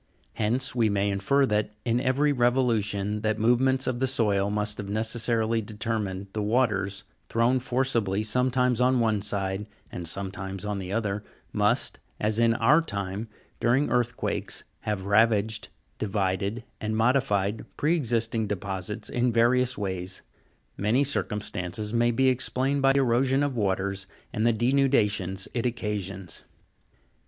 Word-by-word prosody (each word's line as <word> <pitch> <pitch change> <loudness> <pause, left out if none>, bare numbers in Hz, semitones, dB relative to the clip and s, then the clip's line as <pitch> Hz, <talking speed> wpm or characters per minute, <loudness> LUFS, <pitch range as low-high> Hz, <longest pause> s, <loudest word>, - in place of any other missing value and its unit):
Hence 120 +5 0
we 115 -3 +2
may 100 0 +1
infer 120 +9 +2
that, 105 -2 -1
in 120 0 +2
every 135 +4 +2
revolution 115 -5 +1
that 110 0 0
movements 130 +4 +3
of 125 -2 -1
the 130 - +1
soil 105 -6 +1
must 105 0 -2
have 100 -1 -5
necessarily 110 +1 0
determined, 105 -2 -3
the 110 - -2
waters, 105 -4 +1 0.3
thrown 120 +3 +2
forcibly 120 -6 0
sometimes 125 +2 +1
on 130 0 +4
one 110 -3 +2
side 100 0 -2 0.2
and 85 -1 -5
sometimes 95 +2 -4
on 105 -1 -2
the 95 -1 -6
other, 105 -1 -1 0.3
must, - - +1 0.2
as 105 +1 +1
in 115 -1 +4
our 130 +8 +5
time 100 - -4 0.3
during 130 +5 +2
earth 120 -1 +1
quakes, - - -3 0.2
have 105 -3 -3
ravaged, 110 +1 +2 0.3
divided, 100 +2 -1 0.2
and 110 0 -2
modified 110 -4 +1
pre 155 +4 +2
existing 115 -6 0
deposits 100 0 -4
in 120 0 +1
various 125 +2 +3
ways. 95 -2 -4 0.5
Many 110 +7 +2
circumstances 105 -5 -2
may 120 0 +3
be 130 +3 +2
explained 130 +2 +1
by 135 0 +5
erosion 135 +1 +3
of 140 -3 -1
waters, 100 -2 -1 0.3
and 110 +2 +1
the - - +5
denudations 110 -6 +1
it 120 0 0
occasions. 100 -6 -4
110 Hz, 140 wpm, -27 LUFS, 100-125 Hz, 0.5 s, our